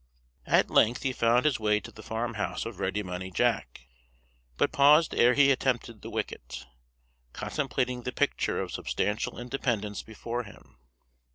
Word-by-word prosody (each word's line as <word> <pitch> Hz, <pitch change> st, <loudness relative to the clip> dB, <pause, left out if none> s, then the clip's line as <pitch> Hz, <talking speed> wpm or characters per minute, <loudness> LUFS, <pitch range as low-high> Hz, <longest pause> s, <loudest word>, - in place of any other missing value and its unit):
At -, -, +3 dB
length 120 Hz, +4 st, +3 dB
he 135 Hz, -2 st, 0 dB
found 120 Hz, +2 st, +3 dB
his 140 Hz, -6 st, +2 dB
way 105 Hz, -1 st, +2 dB
to 100 Hz, -, -11 dB
the 110 Hz, -, -12 dB
farm 115 Hz, +2 st, -3 dB
house 105 Hz, -, -3 dB
of -, -, -7 dB
Ready 95 Hz, +3 st, -1 dB
Money 90 Hz, 0 st, -5 dB
Jack, 65 Hz, -9 st, 0 dB, 0.8 s
but -, -, +2 dB
paused 150 Hz, +3 st, +5 dB
ere 125 Hz, +1 st, +4 dB
he 140 Hz, -1 st, +6 dB
attempted 120 Hz, -4 st, -1 dB
the -, -, -8 dB
wicket; 60 Hz, +1 st, -5 dB, 0.7 s
contemplating 125 Hz, -4 st, -2 dB
the 125 Hz, -, -4 dB
picture -, -, 0 dB
of -, -, -3 dB
substantial 105 Hz, +2 st, -2 dB
independence 120 Hz, -5 st, -2 dB
before 115 Hz, +2 st, -5 dB
him. 105 Hz, -, -15 dB
115 Hz, 155 wpm, -28 LUFS, 105-130 Hz, 0.8 s, he